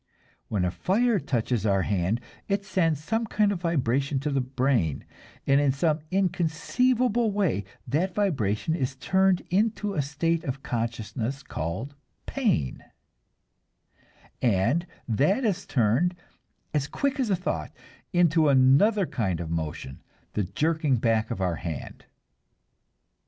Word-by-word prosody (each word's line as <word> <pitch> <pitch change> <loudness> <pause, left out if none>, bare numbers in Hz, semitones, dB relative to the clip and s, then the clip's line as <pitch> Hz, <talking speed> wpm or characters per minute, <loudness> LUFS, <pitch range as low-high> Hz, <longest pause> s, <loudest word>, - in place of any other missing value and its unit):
When 95 -4 0
fire 220 - +1
touches 120 - -1
our 100 -3 +2
hand 100 +3 0 0.3
it 200 0 -1
sends 165 -6 +1
some 225 +5 -1
kind 210 0 +2
of 185 -4 -3
vibration 140 -4 0
to 150 +1 -1
the 135 -1 +1
brain, 125 - 0 0.4
and 140 +1 +4
in 145 -2 +3
some 155 +3 +1
inconceivable 210 +7 +1
way 190 - 0 0.2
that 175 +6 -1
vibration 155 - 0
is 135 -5 -2
turned 190 +7 +2
into 210 +1 +1
a 155 - +1
state 155 +4 -1
of 135 +1 -4
consciousness 120 +1 -3
called 90 - -4 0.3
pain, 210 - -1 1.6
and 120 - +2 0.2
that 150 - +2
is 195 -3 -1
turned, 130 +9 +2 0.6
"as 145 -2 0
quick 280 - -1
as 250 -4 +1
thought," 180 - -1 0.4
into 165 -3 +4
another 140 +11 +5
kind 95 - -2
of 85 -2 -5
motion, 80 -4 -4 0.3
the 105 - 0
jerking 150 - +1
back 115 -1 +1
of 95 - -4
our 90 -3 0
hand. 80 -5 -6
145 Hz, 125 wpm, -26 LUFS, 115-190 Hz, 1.6 s, another